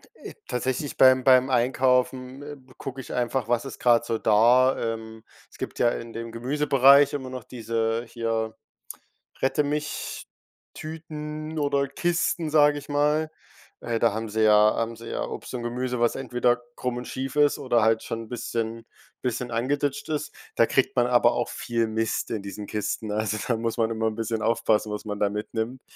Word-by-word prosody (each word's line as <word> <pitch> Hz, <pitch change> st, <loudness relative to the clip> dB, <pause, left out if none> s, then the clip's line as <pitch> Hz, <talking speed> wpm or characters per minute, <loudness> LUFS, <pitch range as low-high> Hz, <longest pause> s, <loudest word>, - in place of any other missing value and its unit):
,äh, -, -, -10 dB
tatsächlich, 130 Hz, +3 st, -2 dB
beim 130 Hz, 0 st, +6 dB
beim 130 Hz, 0 st, +5 dB
Einkaufen, 130 Hz, +1 st, +1 dB
ähm, 145 Hz, -3 st, -10 dB
gucke 135 Hz, 0 st, -6 dB
ich -, -, -9 dB
einfach, 125 Hz, -1 st, -1 dB
was 120 Hz, +2 st, 0 dB
ist 135 Hz, -, -8 dB
grad 120 Hz, -1 st, +4 dB
so 115 Hz, -, -1 dB
da? 120 Hz, +5 st, +4 dB, 0.2 s
Ähm, 110 Hz, 0 st, -10 dB, 0.3 s
es -, -, -16 dB
gibt -, -, -6 dB
ja 120 Hz, -, +4 dB
in 115 Hz, -1 st, -6 dB
dem 115 Hz, 0 st, -6 dB
Gemüsebereich 140 Hz, +2 st, +4 dB
immer 130 Hz, -3 st, -4 dB
noch 130 Hz, -2 st, -7 dB
diese 115 Hz, -1 st, -2 dB
hier 115 Hz, -1 st, -2 dB, 0.9 s
„Rette 135 Hz, +2 st, +2 dB
mich 150 Hz, +1 st, -4 dB, 0.5 s
Tüten 155 Hz, 0 st, -7 dB
oder 140 Hz, -1 st, +1 dB
Kisten,“ 170 Hz, +1 st, -1 dB
sag 150 Hz, -1 st, +5 dB
ich 145 Hz, 0 st, -8 dB
mal. 150 Hz, +2 st, +1 dB, 0.5 s
Äh, 115 Hz, -1 st, -2 dB
da 115 Hz, -3 st, +3 dB
haben 110 Hz, +1 st, -4 dB
sie 110 Hz, +1 st, -1 dB
ja 105 Hz, 0 st, +6 dB
haben 115 Hz, 0 st, -2 dB
sie 115 Hz, +1 st, -10 dB
ja -, -, -2 dB
Obst -, -, -7 dB
und 125 Hz, -2 st, -4 dB
Gemüse, 125 Hz, +1 st, -2 dB
was 120 Hz, -1 st, +2 dB
entweder 125 Hz, -1 st, 0 dB
krumm 125 Hz, -1 st, -3 dB
und 125 Hz, -, -6 dB
schief 135 Hz, +1 st, -5 dB
ist 145 Hz, -1 st, +4 dB
oder 120 Hz, -4 st, +2 dB
halt 110 Hz, 0 st, +2 dB
schon 115 Hz, 0 st, -4 dB
'n 110 Hz, -, -14 dB
bisschen 115 Hz, -1 st, -4 dB, 0.4 s
bisschen 125 Hz, -1 st, -3 dB
angeditscht 140 Hz, +4 st, -1 dB
ist. 155 Hz, 0 st, -3 dB, 0.2 s
Da 115 Hz, -, +5 dB
kriegt 135 Hz, -, +1 dB
man 120 Hz, -1 st, +3 dB
aber 120 Hz, -1 st, +4 dB
auch 120 Hz, -, -1 dB
viel 115 Hz, -1 st, -1 dB
Mist 110 Hz, 0 st, -2 dB
in 105 Hz, -3 st, -3 dB
diesen 100 Hz, +1 st, -7 dB
Kisten, 105 Hz, +1 st, -3 dB
also 110 Hz, +1 st, -1 dB
da 115 Hz, -, +1 dB
muss 115 Hz, +1 st, -2 dB
man 115 Hz, -1 st, +2 dB
immer 110 Hz, 0 st, 0 dB
'n 110 Hz, -, -2 dB
bisschen 115 Hz, 0 st, -2 dB
aufpassen, 110 Hz, -1 st, +1 dB
was 105 Hz, +1 st, -5 dB
man 105 Hz, -1 st, -4 dB
da 100 Hz, -, +2 dB
mitnimmt. 110 Hz, +4 st, -4 dB
120 Hz, 185 wpm, -25 LUFS, 115-135 Hz, 0.9 s, beim